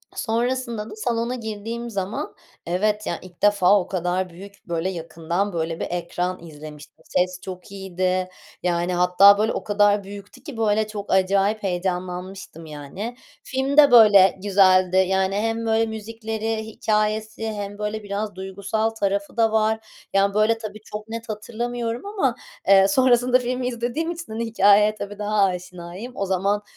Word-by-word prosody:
sonrasında 235 Hz, -1 st, -2 dB
da 215 Hz, -, -9 dB
salona 235 Hz, +2 st, -1 dB
girdiğim 230 Hz, +1 st, -5 dB
zaman 195 Hz, -1 st, -4 dB, 0.3 s
evet 210 Hz, +5 st, 0 dB
ya, 170 Hz, -, -2 dB
ilk 180 Hz, -2 st, -15 dB
defa 205 Hz, -1 st, +5 dB
o 180 Hz, -, -4 dB
kadar 180 Hz, 0 st, -1 dB
büyük, 195 Hz, +3 st, -14 dB
böyle, 170 Hz, +2 st, -1 dB
yakından 170 Hz, +3 st, -3 dB
böyle 165 Hz, 0 st, -2 dB
bir -, -, -2 dB
ekran 175 Hz, 0 st, -3 dB
izlemiştim. 150 Hz, 0 st, -12 dB
Ses 180 Hz, 0 st, -1 dB
çok 185 Hz, +1 st, -9 dB
iyiydi. 185 Hz, -1 st, -2 dB, 0.3 s
Yani, 175 Hz, 0 st, 0 dB
hatta, 180 Hz, +3 st, +6 dB
böyle, 220 Hz, +2 st, +1 dB
o -, -, -4 dB
kadar 205 Hz, -1 st, +3 dB
büyüktü 200 Hz, 0 st, -11 dB
ki, 285 Hz, -7 st, -8 dB
böyle, 215 Hz, -1 st, +1 dB
çok 205 Hz, -1 st, -6 dB
acayip 195 Hz, +3 st, +2 dB
heyecanlanmıştım 180 Hz, -1 st, -4 dB
yani. 155 Hz, -, -7 dB, 0.3 s
Film 270 Hz, +2 st, -2 dB
de, 285 Hz, -3 st, +8 dB
böyle, 205 Hz, -5 st, +7 dB
güzeldi. 185 Hz, -2 st, +4 dB
Yani 190 Hz, +1 st, +2 dB
hem 225 Hz, +2 st, -1 dB
böyle 225 Hz, 0 st, +2 dB
müzikleri, 220 Hz, 0 st, -4 dB
hikâyesi 215 Hz, 0 st, -1 dB
hem 205 Hz, 0 st, -6 dB
böyle 210 Hz, 0 st, -3 dB
biraz 205 Hz, -1 st, -4 dB
duygusal 200 Hz, +3 st, -2 dB
tarafı 200 Hz, 0 st, -2 dB
da 225 Hz, -1 st, +3 dB
var. 220 Hz, 0 st, +2 dB, 0.3 s
Yani, 195 Hz, 0 st, +3 dB
böyle, 215 Hz, +2 st, +3 dB
tabii 215 Hz, -1 st, -8 dB
çok 210 Hz, +1 st, -7 dB
net 230 Hz, 0 st, -6 dB
hatırlamıyorum 235 Hz, -, -4 dB
ama, 335 Hz, -, 0 dB, 0.3 s
eee, 195 Hz, 0 st, +7 dB
sonrasında 250 Hz, +2 st, +4 dB
filmi 250 Hz, 0 st, -2 dB
izlediğim 245 Hz, +8 st, -2 dB
için, 335 Hz, -8 st, -8 dB
hani, 230 Hz, +1 st, -2 dB
hikâyeye 210 Hz, -1 st, +4 dB
tabii 205 Hz, 0 st, -7 dB
daha 210 Hz, -1 st, +2 dB
aşinayım. 180 Hz, +4 st, -4 dB
O 195 Hz, -, -2 dB
zaman, 195 Hz, +2 st, 0 dB
205 Hz, 150 wpm, -23 LUFS, 185-225 Hz, 0.3 s, de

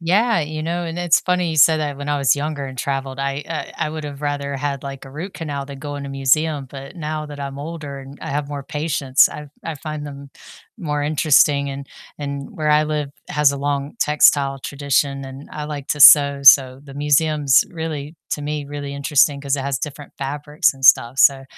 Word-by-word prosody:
Yeah, 200 Hz, +4 st, +2 dB
you 155 Hz, +1 st, -4 dB
know, 170 Hz, +2 st, -2 dB
and 165 Hz, +1 st, -5 dB
it's 175 Hz, -2 st, +3 dB
funny 180 Hz, -2 st, 0 dB
you 160 Hz, -, -4 dB
said 155 Hz, +2 st, +6 dB
that, 145 Hz, -2 st, -3 dB
when 145 Hz, +1 st, -7 dB
I 145 Hz, -1 st, 0 dB
was 140 Hz, 0 st, +3 dB
younger 145 Hz, -1 st, -3 dB
and 130 Hz, -1 st, -9 dB
traveled, 135 Hz, 0 st, -3 dB
I 140 Hz, +1 st, -2 dB
uh, 165 Hz, -, -4 dB
I 155 Hz, -, -1 dB
would've 150 Hz, -2 st, -7 dB
rather 140 Hz, -1 st, -3 dB
had, 140 Hz, 0 st, -3 dB
like, 135 Hz, -1 st, -7 dB
a 135 Hz, -, -12 dB
root 170 Hz, +7 st, -7 dB
canal 145 Hz, -4 st, -5 dB
than 140 Hz, -1 st, -9 dB
go 145 Hz, 0 st, -6 dB
in 140 Hz, -, -6 dB
a -, -, -6 dB
museum, 135 Hz, +2 st, +1 dB
but 140 Hz, +6 st, -10 dB
now 155 Hz, -1 st, -4 dB
that 145 Hz, -1 st, -10 dB
I'm 140 Hz, 0 st, -6 dB
older 145 Hz, -2 st, -7 dB
and 135 Hz, +1 st, -12 dB
I -, -, -7 dB
have 145 Hz, 0 st, -2 dB
more 145 Hz, -1 st, -5 dB
patience, 145 Hz, -2 st, +2 dB
I 150 Hz, -, -8 dB
f 145 Hz, -, -13 dB, 0.2 s
I 165 Hz, -, -4 dB
find 155 Hz, 0 st, -6 dB
them 140 Hz, -1 st, -10 dB, 0.5 s
more 150 Hz, -7 st, -3 dB
interesting 145 Hz, -2 st, +3 dB
and 140 Hz, 0 st, -7 dB, 0.3 s
and 140 Hz, -1 st, -5 dB
where 155 Hz, -1 st, 0 dB
I 150 Hz, 0 st, +4 dB
live 150 Hz, -2 st, -3 dB, 0.2 s
has 150 Hz, -1 st, +3 dB
a -, -, -4 dB
long 140 Hz, 0 st, -2 dB
textile 140 Hz, -2 st, +3 dB
tradition 140 Hz, 0 st, -1 dB
and 135 Hz, +2 st, -10 dB
I 150 Hz, -, -5 dB
like 145 Hz, -2 st, -6 dB
to 150 Hz, -, -2 dB
sew, 140 Hz, -1 st, +8 dB
so 135 Hz, -1 st, +6 dB
the 140 Hz, -, -13 dB
museum's 145 Hz, -1 st, +3 dB
really 160 Hz, -2 st, -6 dB
to 145 Hz, -, -3 dB
me, 150 Hz, 0 st, -3 dB
really 145 Hz, -1 st, -6 dB
interesting 140 Hz, 0 st, +2 dB
'cause 140 Hz, 0 st, -1 dB
it 140 Hz, -, -2 dB
has 140 Hz, -2 st, -2 dB
different 145 Hz, +1 st, -7 dB
fabrics 145 Hz, +1 st, 0 dB
and 135 Hz, 0 st, -9 dB
stuff, 120 Hz, +1 st, +5 dB
so 135 Hz, -1 st, +5 dB
145 Hz, 215 wpm, -20 LUFS, 140-150 Hz, 0.5 s, sew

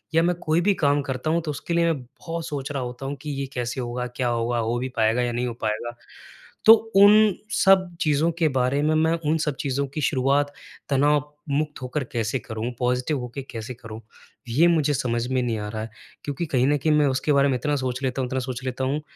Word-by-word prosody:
या 165 Hz, -, +5 dB
मैं 175 Hz, 0 st, +2 dB
कोई 160 Hz, +2 st, +1 dB
भी 200 Hz, +2 st, +3 dB
काम 145 Hz, -3 st, +2 dB
करता 130 Hz, +3 st, -3 dB
हूँ, 170 Hz, +1 st, +1 dB
तो 155 Hz, -2 st, -3 dB
उसके 160 Hz, +4 st, -4 dB
लिए 170 Hz, 0 st, +3 dB
मैं 135 Hz, -, -6 dB
बहुत 165 Hz, +6 st, -7 dB
सोच 140 Hz, -1 st, -4 dB
रहा 135 Hz, -2 st, -2 dB
होता 125 Hz, +2 st, -6 dB
हूँ 140 Hz, -, -3 dB
कि 150 Hz, -, -6 dB
ये -, -, -2 dB
कैसे 125 Hz, +1 st, -3 dB
होगा, 125 Hz, +1 st, -3 dB
क्या 125 Hz, 0 st, -3 dB
होगा, 120 Hz, 0 st, 0 dB
हो 115 Hz, +1 st, 0 dB
भी 130 Hz, +1 st, -3 dB
पाएगा 110 Hz, +2 st, +3 dB
या 120 Hz, -1 st, 0 dB
नहीं 125 Hz, +1 st, -1 dB
हो 120 Hz, -, -3 dB
पाएगा। 110 Hz, +2 st, -2 dB, 0.7 s
तो 220 Hz, -, +11 dB, 0.2 s
उन 205 Hz, +1 st, +7 dB, 0.2 s
सब 185 Hz, -3 st, +4 dB
चीज़ों 155 Hz, +2 st, +2 dB
के 160 Hz, -, +4 dB
बारे 130 Hz, +2 st, +1 dB
में 155 Hz, +1 st, +2 dB
मैं 160 Hz, +1 st, +3 dB, 0.2 s
उन 160 Hz, -, +2 dB
सब 150 Hz, -3 st, -1 dB
चीज़ों 140 Hz, 0 st, -1 dB
की 150 Hz, +3 st, -5 dB
शुरुआत 140 Hz, +1 st, +1 dB, 0.4 s
तनावमुक्त 150 Hz, +1 st, 0 dB
होकर 130 Hz, +3 st, -3 dB
कैसे 115 Hz, +2 st, -1 dB
करूँ, 110 Hz, +2 st, -5 dB
पॉज़िटिव 125 Hz, +3 st, 0 dB
होके 125 Hz, +3 st, -6 dB
कैसे 115 Hz, +1 st, -6 dB
करूँ, 110 Hz, -2 st, -10 dB, 0.5 s
ये 155 Hz, +9 st, +4 dB
मुझे 155 Hz, -4 st, +2 dB
समझ 120 Hz, -2 st, -1 dB
में 130 Hz, -1 st, 0 dB
नहीं 115 Hz, -3 st, -1 dB
आ 105 Hz, -, -4 dB
रहा 110 Hz, 0 st, -4 dB
है। 110 Hz, -, -5 dB, 0.3 s
क्योंकि 145 Hz, +4 st, -3 dB
कहीं 130 Hz, -3 st, +1 dB
न 145 Hz, +1 st, +3 dB
कहीं 155 Hz, +2 st, +1 dB
मैं 150 Hz, -1 st, +4 dB
उसके 135 Hz, +3 st, 0 dB
बारे 140 Hz, 0 st, +4 dB
में 130 Hz, -, +1 dB
इतना 150 Hz, +2 st, -1 dB
सोच 130 Hz, -1 st, -2 dB
लेता 130 Hz, 0 st, -1 dB
हूँ, 125 Hz, -, -1 dB
इतना 130 Hz, +1 st, -2 dB
सोच 130 Hz, 0 st, -5 dB
लेता 130 Hz, 0 st, -3 dB
हूँ 140 Hz, +3 st, -1 dB
135 Hz, 230 wpm, -24 LUFS, 125-150 Hz, 0.7 s, तो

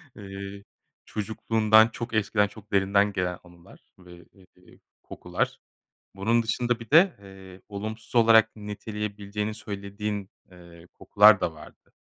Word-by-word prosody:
eee, 100 Hz, 0 st, -9 dB, 0.4 s
çocukluğundan, 110 Hz, +1 st, +2 dB
çok 120 Hz, 0 st, -7 dB
eskiden, 105 Hz, -1 st, +1 dB
çok 105 Hz, 0 st, -16 dB
derinden 100 Hz, +1 st, +2 dB
gelen 90 Hz, -2 st, -2 dB
anılar 85 Hz, -1 st, -18 dB, 0.2 s
ve, 90 Hz, -1 st, -15 dB
eee, 90 Hz, -1 st, -22 dB, 0.2 s
kokular. -, -, -4 dB, 0.6 s
Bunun 115 Hz, +4 st, +1 dB
dışında 120 Hz, +1 st, -1 dB
bir 115 Hz, -2 st, -11 dB
de, 170 Hz, +4 st, +5 dB
eee, 95 Hz, -1 st, -14 dB
olumsuz 110 Hz, +3 st, -7 dB
olarak 115 Hz, -1 st, +5 dB
niteleyebileceğini 105 Hz, 0 st, -5 dB
söylediğin, 100 Hz, -1 st, -5 dB, 0.2 s
eee, 85 Hz, -1 st, -16 dB
kokular 105 Hz, -1 st, +5 dB
da 80 Hz, -, -1 dB
vardı 75 Hz, -, -16 dB
105 Hz, 120 wpm, -26 LUFS, 95-110 Hz, 0.6 s, de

